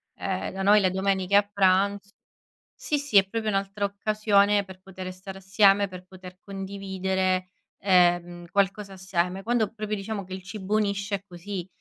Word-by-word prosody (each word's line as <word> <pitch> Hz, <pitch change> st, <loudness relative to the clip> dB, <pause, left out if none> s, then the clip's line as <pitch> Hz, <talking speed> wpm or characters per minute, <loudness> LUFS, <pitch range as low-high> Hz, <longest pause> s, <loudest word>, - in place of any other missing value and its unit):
Ehm, -, -, -3 dB
da 195 Hz, -, -5 dB
noi 210 Hz, +2 st, +6 dB
le 190 Hz, -2 st, +2 dB
domeniche 190 Hz, 0 st, 0 dB
a 205 Hz, -, +7 dB
pranz 200 Hz, +1 st, +2 dB, 0.6 s
sì, 295 Hz, -, -2 dB
sì, 280 Hz, -7 st, -2 dB
è 195 Hz, -1 st, +7 dB
proprio 220 Hz, +1 st, -3 dB
un'altra 195 Hz, 0 st, -1 dB
occasione 205 Hz, 0 st, +2 dB
per 185 Hz, 0 st, -13 dB
potere 185 Hz, -1 st, -8 dB
stare 190 Hz, +1 st, -10 dB
assieme, 195 Hz, +1 st, +4 dB
per 185 Hz, -1 st, -10 dB
poter 185 Hz, 0 st, -12 dB
condividere, 190 Hz, -1 st, -2 dB, 0.3 s
ehm, 175 Hz, -2 st, +2 dB
qualcosa 200 Hz, +1 st, 0 dB
assieme. 185 Hz, 0 st, -2 dB
Quando 230 Hz, -2 st, 0 dB
proprio 215 Hz, -1 st, -3 dB
diciamo 200 Hz, 0 st, -5 dB
che 185 Hz, +1 st, -8 dB
il 190 Hz, -, -7 dB
cibo 195 Hz, +2 st, -5 dB
unisce 200 Hz, -1 st, 0 dB
è 195 Hz, -, -3 dB
così, 180 Hz, 0 st, -6 dB
195 Hz, 165 wpm, -26 LUFS, 185-205 Hz, 0.6 s, a